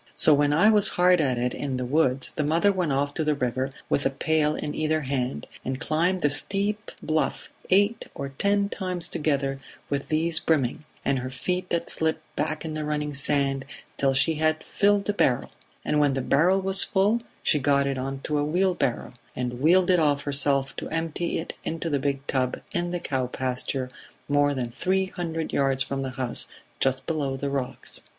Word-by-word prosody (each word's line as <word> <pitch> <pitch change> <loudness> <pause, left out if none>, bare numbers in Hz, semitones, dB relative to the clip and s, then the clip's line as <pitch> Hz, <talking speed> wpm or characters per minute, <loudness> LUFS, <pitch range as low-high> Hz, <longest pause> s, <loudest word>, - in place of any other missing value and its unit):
So 155 - +5
when 145 0 +3
I 175 +9 +5
was 210 -2 +4
hard 180 -1 +5
at 130 -4 +1
it 125 +1 -1
in 135 -3 -3
the 125 - -2
woods 135 -1 +2
the 155 - -2
mother 165 +7 +3
went 180 -6 -1
off 140 +1 0
to 160 - -1
the 150 -1 +1
river 130 0 -1 0.2
with 140 - +1
a - - +2
pail 150 +2 +1
in 145 - -4
either 155 0 0
hand, 130 - -2 0.2
and 130 +1 -3
climbed 170 +4 0
the 145 - +3
steep 200 +7 +1
bluff 155 0 -1 0.2
eight 205 +4 +2
or 140 - -4
ten 200 +8 +1
times 180 -4 -3
together 140 -5 -1 0.3
with 140 -1 -1
these 160 +1 +1
brimming, 150 -2 0 0.2
and 140 -1 +1
her 130 +1 -4
feet 180 +8 -3
that 170 0 -1
slipped 160 0 -1
back 155 +2 -2
in 155 - -4
the 155 0 -3
running 150 -1 -2
sand, 140 -1 +1 0.3
till 135 -1 +2
she 150 +5 +4
had 155 0 +1
filled 205 -1 +2
a 205 - +1
barrel; 125 -11 +1 0.3
and 150 - +1
when 145 -2 +3
the 135 - -1
barrel 175 +9 +3
was 190 0 +4
full 210 +3 +2 0.2
she 150 - +3
got 140 0 +2
it 135 -1 -1
on 135 +1 -4
a 150 - -3
wheelbarrow, 175 -4 0 0.2
and 125 0 -3
wheeled 180 +4 +5
it 180 - +4
off 145 -3 +2
herself 140 -1 +1
to - - -5
empty 165 +1 -2
it 165 - -4
into 165 0 -3
the 140 - +1
big 140 0 -2
tub 130 -2 -1
in 175 0 -1
the 175 0 -2
cow 130 -5 -2
pasture 130 +1 -2 0.4
more 145 0 +2
than 120 -3 -3
three 190 +9 0
hundred 165 -3 -4
yards 135 -1 +2
from 135 0 -3
the 135 - -3
house, 125 -1 -2 0.3
just 130 -1 +1
below 145 -5 -2
the 140 +1 -3
rocks. 135 -2 -5
150 Hz, 195 wpm, -26 LUFS, 135-170 Hz, 0.4 s, So